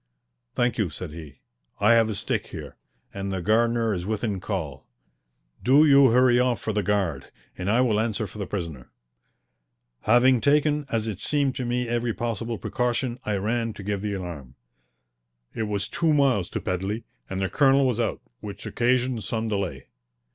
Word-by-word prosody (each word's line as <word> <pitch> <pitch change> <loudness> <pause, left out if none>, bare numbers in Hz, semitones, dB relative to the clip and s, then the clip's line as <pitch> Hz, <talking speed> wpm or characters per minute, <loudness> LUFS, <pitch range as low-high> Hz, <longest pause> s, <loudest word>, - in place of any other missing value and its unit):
"Thank 120 -1 +1
you," 100 -5 +1
said 80 +2 -7
he. 75 -4 -11 0.4
"I 105 +3 +5
have 115 -1 +4
a 105 - -2
stick - - -2
here, - - -8 0.4
and 100 0 -4
the 95 - -2
gardener 115 +3 +2
is 90 -3 -3
within 105 0 -2
call. 90 -8 -5 0.8
Do 140 +5 +6
you 140 -2 +7
hurry 125 +1 +4
off 125 -1 +1
for 110 - -3
the 105 - +1
guard, 95 -8 -1 0.2
and 90 +2 -3
I 115 +4 +4
will 110 -5 +2
answer 110 -1 -1
for 105 +2 -10
the 100 - -3
prisoner." 85 -10 -5 1.1
Having 120 +2 +4
taken, 150 +1 +2
as 115 -1 -1
it 105 -4 -4
seemed 140 0 +1
to 125 - -2
me, 120 0 -1
every 120 -1 -1
possible 115 0 -3
precaution, 125 +2 -1
I 105 - +1
ran 115 +3 -1
to 100 - -9
give 100 0 -2
the 105 -1 -2
alarm. 80 -9 -7 1.0
It 110 -1 -2
was 100 -1 -2
two 165 -2 +1
miles 130 -10 +2
to - - -3
Pedley, 95 +5 -2 0.3
and 95 - -3
the 95 - 0
colonel 135 - +4
was 125 -3 0
out, 115 - -1 0.2
which 105 -1 -8
occasioned 125 -1 0
some 110 +3 -2
delay. 95 -11 -3
110 Hz, 175 wpm, -25 LUFS, 95-120 Hz, 1.1 s, you